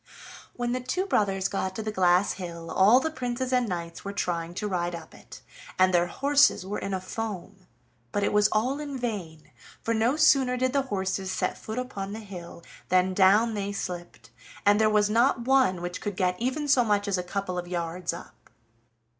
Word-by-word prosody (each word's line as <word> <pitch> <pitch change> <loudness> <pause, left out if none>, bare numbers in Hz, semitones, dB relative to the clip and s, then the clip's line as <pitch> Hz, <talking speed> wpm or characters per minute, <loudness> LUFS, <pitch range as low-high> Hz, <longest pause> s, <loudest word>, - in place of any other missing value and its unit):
When 240 -1 -2
the 255 - -1
two 255 +10 -2
brothers 195 - +1
got 190 -1 -3
to 220 - -4
the 215 - -3
glass 180 -1 +3
hill, 170 -3 -7
all 210 +7 +6
the 320 +4 -2
princes 255 -2 -3
and 250 -3 +2
knights 170 -2 -5
were 200 - -4
trying 170 -3 -2
to 210 - -2
ride 175 -3 -2
up 165 -2 -10
it, - - -13 0.4
and 185 0 +4
their 175 0 +3
horses 280 -1 +3
were 205 +2 -3
in 195 - -4
a - - -2
foam; 195 -1 -6 0.4
but 205 - -1
it - - 0
was 210 0 +5
all 250 +7 0
in 285 -2 -5
vain, 190 -11 -5 0.3
for 230 - 0
no 230 +5 +2
sooner 270 -5 +4
did 255 +1 0
the 280 - +3
horses 190 -1 -2
set 185 - -1
foot 220 +2 -7
upon 205 -6 -4
the 220 - -5
hill 180 -5 -10 0.3
than 185 +1 +3
down 205 +5 +4
they 200 -1 -3
slipped, 180 -3 -7 0.3
and 205 +1 +5
there 215 - +4
was 210 -1 +3
not 235 +4 +2
one 245 -8 +2
which 175 0 -5
could 205 -2 -4
get 180 -2 +1
even 265 +5 -1
so 260 -3 +5
much 205 -2 +1
as 195 -2 0
a - - -2
couple 185 0 -3
of 175 - -6
yards 175 0 -3
up. 170 +2 -12
200 Hz, 205 wpm, -27 LUFS, 180-240 Hz, 0.4 s, all